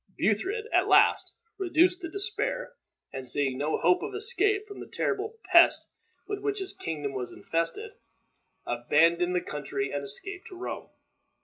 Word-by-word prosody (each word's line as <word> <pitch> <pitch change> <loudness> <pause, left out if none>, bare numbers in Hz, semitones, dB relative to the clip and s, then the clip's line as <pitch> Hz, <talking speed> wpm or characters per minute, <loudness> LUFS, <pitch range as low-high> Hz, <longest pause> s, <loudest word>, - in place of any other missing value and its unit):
Buthred, 370 - 0
at - - +4
last, - - +5 0.3
reduced 360 0 +3
to 335 - -5
despair, 440 +7 -2 0.4
and 130 - -5
seeing 135 +1 +1
no 150 +2 0
hope 180 +2 +3
of - - -5
escape 415 -1 +1
from 405 -2 -10
the - - -8
terrible 430 +2 -2
pest 340 -1 +6 0.4
with 410 -1 -3
which 415 0 -2
his 385 -1 -4
kingdom 145 -4 -4
was 125 -2 -4
infested, 165 0 -2 0.7
abandoned 165 +9 +2
the 180 - +1
country 140 -2 -3
and 145 0 -3
escaped 360 - -4
to 370 - -10
Rome. 365 - -6
335 Hz, 150 wpm, -28 LUFS, -, 0.7 s, pest